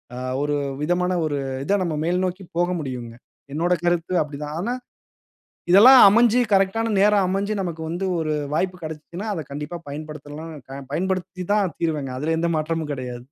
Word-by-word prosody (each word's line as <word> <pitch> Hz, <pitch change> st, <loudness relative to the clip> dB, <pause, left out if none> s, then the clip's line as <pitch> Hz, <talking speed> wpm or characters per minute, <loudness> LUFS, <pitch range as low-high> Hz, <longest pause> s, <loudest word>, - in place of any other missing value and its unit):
அ -, -, -7 dB, 0.2 s
ஒரு 145 Hz, 0 st, 0 dB, 0.3 s
விதமான 180 Hz, +3 st, +1 dB
ஒரு 145 Hz, -2 st, -1 dB, 0.3 s
இத 200 Hz, -, 0 dB
நம்ம 165 Hz, -3 st, -2 dB
மேல்நோக்கி 180 Hz, +2 st, -1 dB
போக 175 Hz, +1 st, +2 dB
முடியுங்க. 125 Hz, -5 st, -5 dB, 0.4 s
என்னுடைய 175 Hz, +3 st, +1 dB
கருத்து 175 Hz, +1 st, +1 dB
அப்பிடி 150 Hz, -2 st, -4 dB
தான். 150 Hz, +1 st, -5 dB
ஆனா, 235 Hz, +7 st, -1 dB, 1.0 s
இதெல்லாம் 245 Hz, +8 st, +9 dB
அமஞ்சு 235 Hz, +3 st, +4 dB
கரெக்ட் 195 Hz, +2 st, +3 dB
ஆன 225 Hz, -1 st, 0 dB
நேரம் 205 Hz, -1 st, +4 dB
அமஞ்சு 200 Hz, +3 st, -1 dB
நமக்கு 170 Hz, -3 st, -4 dB
வந்து 175 Hz, +4 st, -3 dB
ஒரு 155 Hz, -1 st, -1 dB, 0.2 s
வாய்ப்பு 185 Hz, +2 st, 0 dB
கிடச்சிச்சுன்னா, 160 Hz, +6 st, -7 dB
அத 160 Hz, -, -3 dB
கண்டிப்பா 150 Hz, +4 st, -5 dB
பயன்படுத்தலாம் 155 Hz, +1 st, -7 dB, 0.2 s
அ -, -, -6 dB
பயன்படுத்தி 185 Hz, +1 st, -2 dB
தான் 200 Hz, -5 st, +1 dB
தீருவேங்க. 150 Hz, -6 st, -1 dB
அதில 160 Hz, +3 st, 0 dB
எந்த 170 Hz, 0 st, +1 dB
மாற்றமும் 155 Hz, -1 st, -2 dB
கிடையாது. 125 Hz, -2 st, -6 dB
170 Hz, 160 wpm, -23 LUFS, 150-190 Hz, 1.0 s, இதெல்லாம்